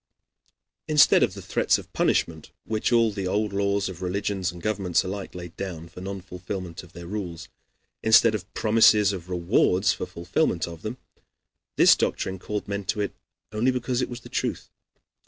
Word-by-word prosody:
Instead 150 -3 +6
of - - +2
the - - -8
threats - - +2
of - - -12
punishment 80 -2 0 0.2
which 110 +1 -1
all 115 -2 +4
the 100 -2 -3
old 105 +2 0
laws 100 0 +1
of 95 -1 -8
religions 95 0 -1
and 90 - -11
governments 100 -5 +1
alike 95 0 -6
laid 85 -2 -8
down 85 -4 -5
for 85 +2 -11
non 95 0 -5
fulfillment 90 -1 -6
of 85 0 -17
their 85 - -9
rules, 90 -3 -6 0.5
instead 110 +1 +6
of 100 -2 -5
promises 105 -2 +5
of 90 -2 -7
rewards 90 +2 +2
for - - -5
fulfillment 85 0 -1
of 85 -1 -9
them, 110 +4 -5 0.8
this - - +7
doctrine 95 0 -2
called 105 +2 -4
men 100 0 -3
to 95 +3 -2
it 100 - -1 0.4
only 110 +4 +1
because 125 0 -1
it - - -2
was 120 0 -7
the - - -12
truth. - - -3
100 Hz, 175 wpm, -25 LUFS, 90-105 Hz, 0.8 s, this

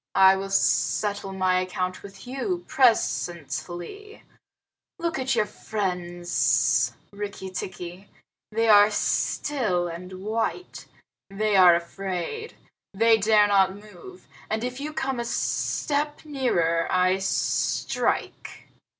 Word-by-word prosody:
"I 190 0 +7
will 195 0 -4
settle 200 0 +1
my 185 -1 +1
account 185 0 -3
with 195 +1 -12
you 345 +8 -3
presently. 175 - -1 0.7
Look 335 -5 -2
at 260 0 0
your - - +2
friends, 175 - 0 0.2
Rikki 200 -2 -6
tikki. 180 +1 -7 0.4
They 225 +1 +1
are 205 -1 +7
still 210 -4 0
and 180 +2 -8
white. 225 - -3 0.4
They 210 +1 0
are 180 -2 +8
afraid. 190 - -4 0.4
They 225 +2 +4
dare 210 0 +5
not 195 -2 +3
move, 215 - -14 0.2
and 220 +1 -2
if 250 +1 -4
you 295 +2 -4
come 270 -5 -2
a - - -1
step 295 +5 -2
nearer 175 - 0
I 185 +1 +2
strike." 195 - -1
195 Hz, 110 wpm, -25 LUFS, 180-235 Hz, 0.7 s, are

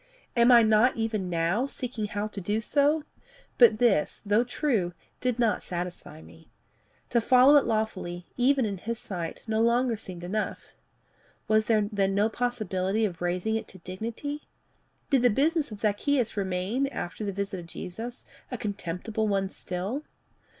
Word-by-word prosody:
Am 235 +1 +6
I 235 -1 +8
not 220 +4 +4
even 220 -5 -2
now 175 +9 +1
seeking 245 -5 -3
how 205 0 -3
to 200 - -6
do 205 +4 0
so? 290 +6 +2 0.6
But 235 -3 +7
this, 215 -9 +2
though 205 +3 +3
true, 235 - -1 0.2
did 250 -2 0
not 230 -3 +2
satisfy 175 -3 -6
me. 160 - -17 0.6
To 235 - +3
follow 255 +5 +6
it 285 - +3
lawfully 185 -5 -2
even 260 0 +3
in 200 -3 -3
his 230 +4 -4
sight 175 -6 -6
no 220 -1 0
longer 235 +1 +3
seemed 180 -4 -8
enough. 210 +5 -3 0.7
Was 215 0 +3
there 215 -2 +2
then 195 -2 +1
no 210 +2 +3
possibility 215 -4 -1
of 175 -5 -5
raising 180 +5 0
it 225 - -3
to 190 - -11
dignity? 230 - -6 0.6
Did 270 -3 +4
the 245 - +5
business 300 +6 +1
of 210 - -8
Zacchaeus 230 +4 +1
remain, 195 +7 -1
after 215 -6 -5
the 200 - -1
visit 195 -1 -3
of 170 - -10
Jesus, 225 +8 -6 0.2
a 250 - -4
contemptible 205 +1 -3
one 195 -2 0
still? 195 +11 -4
215 Hz, 160 wpm, -27 LUFS, 190-245 Hz, 0.7 s, I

